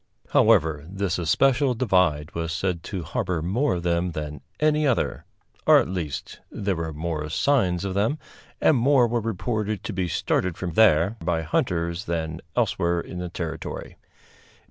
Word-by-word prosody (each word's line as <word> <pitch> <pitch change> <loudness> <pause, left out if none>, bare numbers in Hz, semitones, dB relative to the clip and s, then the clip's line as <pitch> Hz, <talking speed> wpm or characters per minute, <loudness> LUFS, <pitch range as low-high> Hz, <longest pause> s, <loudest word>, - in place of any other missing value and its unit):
However, 80 -9 +4
this 95 -2 -2
especial 125 - +2
divide 90 -10 +1
was 80 -1 -3
said 85 +1 -1
to 95 -4 -4
harbor 80 +1 -2
more 115 - +1
of 85 - -4
them 85 0 0
than 75 -2 -5 0.2
any 150 0 +3
other; 130 - 0 0.4
or, - - +8
at - - +2
least, 85 -6 -4
there 100 -2 -2
were 80 -1 -3
more 75 -1 -3
signs 95 - +1
of 95 - -2
them, 110 +10 +1 0.4
and 150 - +4
more 130 +1 +4
were 120 0 0
reported 110 0 -2
to 110 - -4
be 95 -1 -1
started 90 0 0
from 90 -2 -3
there 95 +1 +4
by 80 -1 0
hunters 85 +2 -1
than 80 -2 -3
elsewhere 85 0 +1
in 90 +1 -6
the 90 0 -4
territory. 85 -2 -6
90 Hz, 160 wpm, -25 LUFS, 80-110 Hz, 0.4 s, or